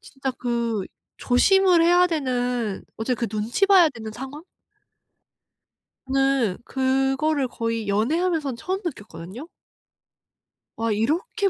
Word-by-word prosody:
진짜 270 -1 -5
그 235 -5 -2 0.3
조심을 365 +7 +4
해야 355 +1 +5
되는 250 - -2
어째 235 +3 -1
그 235 0 -2
눈치 220 - 0
봐야 380 -4 +6
되는 225 -6 -8
상황? 270 +6 -8 1.6
네. 270 -6 +1
그거를 270 +2 +1
거의 230 -2 -3
연애하면서는 295 - 0
처음 375 - -3
느꼈거든요. 215 - -8 1.3
와 230 0 -1
이렇게 355 - 0
265 Hz, 230 characters per minute, -23 LUFS, 230-320 Hz, 1.6 s, 봐야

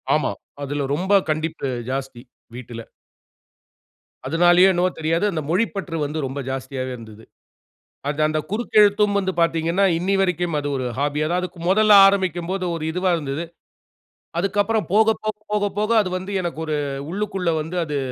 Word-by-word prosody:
ஆமா. - - 0 0.3
அதில 140 0 -2
ரொம்ப 190 +6 0 0.2
கண்டிப்பு 155 -1 -2 0.2
ஜாஸ்தி! 135 -2 -4 0.3
வீட்டில. 120 -2 -8 1.4
அதனாலேயோ 175 +2 +5
என்னவோ 180 +1 +2
தெரியாது. 165 +4 +1
அந்த 160 -4 -2
மொழிப்பற்று 190 -2 -1
வந்து 150 +2 -4
ரொம்ப 135 +2 -5
ஜாஸ்தியாவே 130 0 -4
இருந்தது. 110 -2 -12 0.9
அது 145 +1 -2
அந்த 155 0 0
குறுக்கெழுத்தும் 210 -2 +3
வந்து 190 -1 -1
பார்த்தீங்கன்னா, 165 +3 +1
இன்னைய 195 +3 0
வரைக்கும் 175 -3 0
அது 145 0 -3
ஒரு 130 - -3
ஹாபி! 145 +1 0
அதாவது 180 +2 -1 0.2
முதல்ல 215 +3 +5
ஆரம்பிக்கும்போது 185 -1 0
ஒரு 160 - -5
இதுவா 180 +2 0
இருந்தது. 145 0 -4 0.9
அதுக்கு 195 +3 -1
அப்புறம் 220 +1 -1
போக, 215 +2 +5 0.2
போக, 215 -1 -2 0.2
போக, 205 -1 +1
போக 210 +1 0
அது 200 - -1
வந்து 190 +2 -7
எனக்கு 175 -3 -4
ஒரு 155 -1 -1 0.4
உள்ளுக்குள்ள 195 -3 -1
வந்து 165 +4 -5
அது 150 -1 -2
175 Hz, 145 wpm, -22 LUFS, 150-195 Hz, 1.4 s, அதனாலேயோ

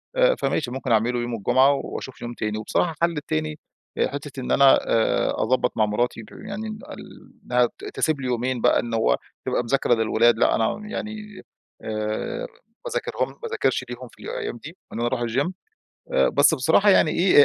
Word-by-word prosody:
آآ، - - +4
فماشي 140 - -1
ممكن 130 -1 -3
أعمله 115 +2 +2
يوم 120 0 -3
الجمعة، 130 +6 +4
وأشوف 130 -1 -6
يوم 120 0 -5
تاني، 110 -2 -3
وبصراحة 110 +10 0
الحل 165 +1 -1
التاني 155 0 -3 0.5
حتة 145 -1 -7
إن 125 - -4
أنا 140 -1 +6
آآ، 115 -1 +2
أضبط 130 +2 0
مع 110 - +4
مراتي 115 +2 -1
يعني 210 +1 -6
ال 215 0 -10 0.2
إنّها - - +3 0.2
تسيب 155 - 0
لي 130 - -3
يومين 125 0 -1
بقى - - +4
إنّه 115 -1 -2
هو 60 - +2 0.3
تبقى - - 0
مذاكرة 120 0 +2
للولاد. 115 +1 +3
لا - - +3
أنا 115 - 0
يعني 215 -2 -6 0.4
آآ، 110 - -3 0.4
باذاكرهم - - -2
ما - - -14
باذكرش 465 0 0
ليهم - - -7
في - - -17
الأيّام 460 -1 -4
دي، 165 +5 -11 0.2
إن - - -5
أنا 120 - +1
أروح 120 - -1
الGym. 130 +8 0 0.6
آآ، 65 - +4
بس 145 +3 +4
بصراحة 160 +9 +4
يعني 160 - +5
إيه 170 -5 +6
135 Hz, 175 wpm, -24 LUFS, 115-175 Hz, 0.6 s, أنا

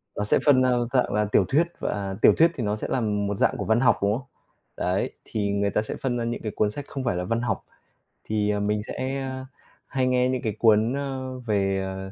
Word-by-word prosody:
Nó 105 - -1
sẽ 105 - +2
phân 140 -3 +6
ra 130 - +3 0.2
dạng 125 -2 +2
là 105 0 +2
tiểu 105 - +3
thuyết, 160 +5 +3
và 100 -1 -3
tiểu - - +7
thuyết 165 +1 +5
thì 125 - -3
nó 105 0 0
sẽ 110 - -5
là 130 - 0
một 105 -2 -1
dạng - - +2
của - - -3
văn 110 +1 +3
học, 125 0 +4
đúng 100 0 +2
không? 135 +2 -11 0.5
Đấy, - - 0
thì 105 -2 -2
người 100 0 +1
ta 105 - +1
sẽ 110 - -5
phân 125 -2 -1
ra 120 - -2
những 120 +1 -3
cái 110 - -3
cuốn 105 -1 +1
sách 145 +5 -7
không 135 - -5
phải 120 -8 0
là 90 - -2
văn 115 +5 -1
học, 120 - -2 0.6
thì 105 -1 0
mình 105 +1 0
sẽ 135 +1 -3 0.6
hay 130 -2 0
nghe 125 0 +2
những 130 -1 -1
cái 110 - -2
cuốn, 110 +1 +4
ơ, 130 -2 -4
về, 100 -5 0
ờ, 95 0 -6
110 Hz, 245 wpm, -25 LUFS, 105-130 Hz, 0.6 s, tiểu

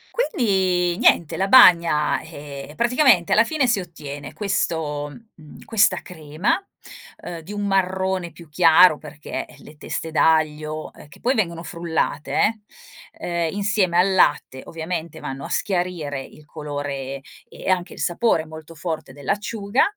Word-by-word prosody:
Quindi 190 - +1
niente 170 -9 +3
la 195 +3 -1
bagna, 170 -10 +6
eh, 145 -3 -9
praticamente 240 - +3
alla 220 - +6
fine 285 0 0
si 220 -5 +1
ottiene 145 -4 -8
questo, 160 -7 -2 0.3
mhmm, 155 -2 -15
questa 215 -3 +3
crema, 160 - -2 0.6
ehm, 170 -1 -8
di 170 +6 -11
un 205 0 -3
marrone 190 -2 0
più 170 +1 -14
chiaro 160 0 +6
perché 150 0 -7
le 155 - -15
teste 160 +2 -5
d'aglio, 155 -1 +1
eh 145 - -15
che - - -16
poi 255 +2 +1
vengono 170 -6 -1
frullate 170 +5 -1 0.5
eh, 170 -1 -3
ehm, - - -7
insieme 200 -4 +1
al 190 +2 +3
latte 145 -7 +2
ovviamente 165 0 -5
vanno 135 +1 -6
a - - -7
schiarire 175 -8 -2
il 150 - -16
colore 145 -3 -5 0.3
e - - -7
anche 180 -1 0
il - - -11
sapore 175 -2 +1
molto 160 +1 -11
forte 160 -4 -5
dell'acciuga, 200 - -1
170 Hz, 140 wpm, -22 LUFS, 150-195 Hz, 0.6 s, bagna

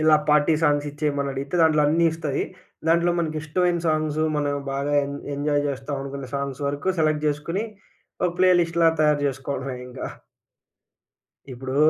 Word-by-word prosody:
ఇలా 155 0 +6
party 150 +1 +4
songs 145 -1 +2
ఇచ్చేయమనడిగితే 140 -1 -2
దాంట్లో 155 -2 +4
అన్నీ 165 +3 +3
ఇస్తాయి. 155 -4 -2 0.4
దాంట్లో 170 +1 +4
మనకిష్టమైన 165 +2 0
సాంగ్స్ 155 0 0 0.2
మనం 145 -1 0 0.2
బాగా 140 +1 -1
ఎం 140 - -5 0.2
ఎంజాయ్ 145 0 0
జేస్తామనుకున్న 135 -1 -4
సాంగ్స్ 140 0 -4
వరకు 145 +6 -3
సెలెక్ట్ 155 -1 +1
జేసుకొని, 165 +8 -2 0.6
ఒక 180 - +2
ప్లే 185 0 +5
లిస్ట్‌లా 165 0 +3
తయారు 150 -1 +3
చేసుకోవడమే 135 0 -4
ఇంకా. 125 +1 -6 1.5
ఇప్పుడు 130 +1 -5
150 Hz, 130 wpm, -24 LUFS, 140-155 Hz, 1.5 s, ఇలా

